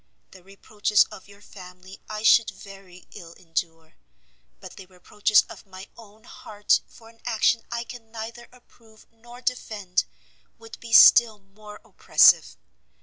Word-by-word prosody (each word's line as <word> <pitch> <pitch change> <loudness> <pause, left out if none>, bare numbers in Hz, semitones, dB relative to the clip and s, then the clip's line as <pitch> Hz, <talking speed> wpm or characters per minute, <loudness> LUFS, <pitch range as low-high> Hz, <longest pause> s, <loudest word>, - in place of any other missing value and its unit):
The 185 - -17
reproaches 205 +2 -1
of 190 - -14
your 200 0 -19
family 185 -1 -15
I 215 0 -7
should 225 0 +4
very 195 -3 -15
ill 165 -1 -13
endure; 165 -2 -7 0.6
but - - -13
the 190 - -14
reproaches 200 +3 0
of - - -15
my 190 0 -13
own 215 -1 -18
heart 210 -3 -2
for 225 - -19
an 230 0 -24
action 225 +1 0
I 235 - -4
can 235 -2 -14
neither 230 +1 -10
approve 230 -3 -23
nor 240 +2 -17
defend, 215 -7 -3 0.5
would 225 0 -14
be 230 - -12
still 230 -1 +6
more 210 +1 -16
oppressive. - - +2
210 Hz, 145 wpm, -23 LUFS, 190-225 Hz, 0.6 s, still